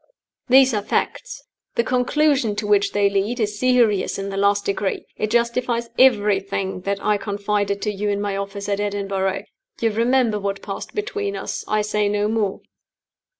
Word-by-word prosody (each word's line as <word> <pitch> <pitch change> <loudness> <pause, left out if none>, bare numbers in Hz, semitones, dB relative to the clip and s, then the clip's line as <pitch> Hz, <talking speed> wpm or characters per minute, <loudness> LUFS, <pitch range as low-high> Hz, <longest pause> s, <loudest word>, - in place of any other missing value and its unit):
"These 260 0 +6
are 210 - 0
facts. - - -2 0.3
The 235 - +2
conclusion 255 -2 +1
to 210 +1 -3
which 205 -1 +3
they 205 -1 +3
lead 200 +5 -1
is 210 -1 -1
serious 245 -6 +2
in 195 0 -4
the 195 - -5
last 200 +1 +2
degree. 200 0 -2
It 215 - -2
justifies 235 0 0
everything 200 -6 +2
that 200 0 -1
I 210 -1 +3
confided 200 -1 -2
to 210 - 0
you 205 +1 -2
in 200 0 0
my 205 -1 -2
office 200 0 -5
at 200 -1 -1
Edinburgh. 195 -1 -1 0.4
You 225 -1 +1
remember 230 0 +2
what 200 0 -3
passed 195 - -6
between 415 -1 -2
us. - - -4
I 215 0 +1
say 210 -1 0
no 205 0 +1
more. 215 -3 -1
210 Hz, 170 wpm, -22 LUFS, 200-235 Hz, 0.4 s, These